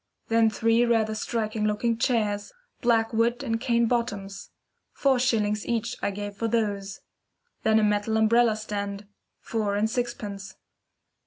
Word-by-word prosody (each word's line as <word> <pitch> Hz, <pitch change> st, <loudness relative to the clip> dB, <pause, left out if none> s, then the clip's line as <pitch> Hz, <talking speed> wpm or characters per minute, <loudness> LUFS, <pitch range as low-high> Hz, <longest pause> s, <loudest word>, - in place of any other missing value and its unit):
Then 225 Hz, 0 st, +4 dB
three 230 Hz, +2 st, +2 dB
rather 225 Hz, -2 st, +2 dB
striking 215 Hz, -1 st, -2 dB
looking 215 Hz, +2 st, +1 dB
chairs, 215 Hz, -3 st, 0 dB, 0.3 s
black 230 Hz, -2 st, +2 dB
wood 235 Hz, +3 st, +1 dB
and 225 Hz, -3 st, -2 dB
cane 235 Hz, -2 st, +2 dB
bottoms. 205 Hz, -5 st, -2 dB, 0.4 s
Four 270 Hz, -2 st, +2 dB
shillings 215 Hz, -4 st, +1 dB
each 235 Hz, +1 st, -2 dB
I -, -, 0 dB
gave 205 Hz, 0 st, -6 dB
for 230 Hz, +3 st, -2 dB
those. 205 Hz, -4 st, -2 dB, 0.6 s
Then 220 Hz, 0 st, +3 dB
a 220 Hz, -, +3 dB
metal 210 Hz, +1 st, +1 dB
umbrella 225 Hz, +1 st, +4 dB
stand, 205 Hz, -1 st, -5 dB, 0.4 s
four 210 Hz, -3 st, -1 dB
and 210 Hz, +2 st, +2 dB
sixpence. 220 Hz, -5 st, -4 dB
220 Hz, 140 wpm, -26 LUFS, 205-235 Hz, 0.6 s, Then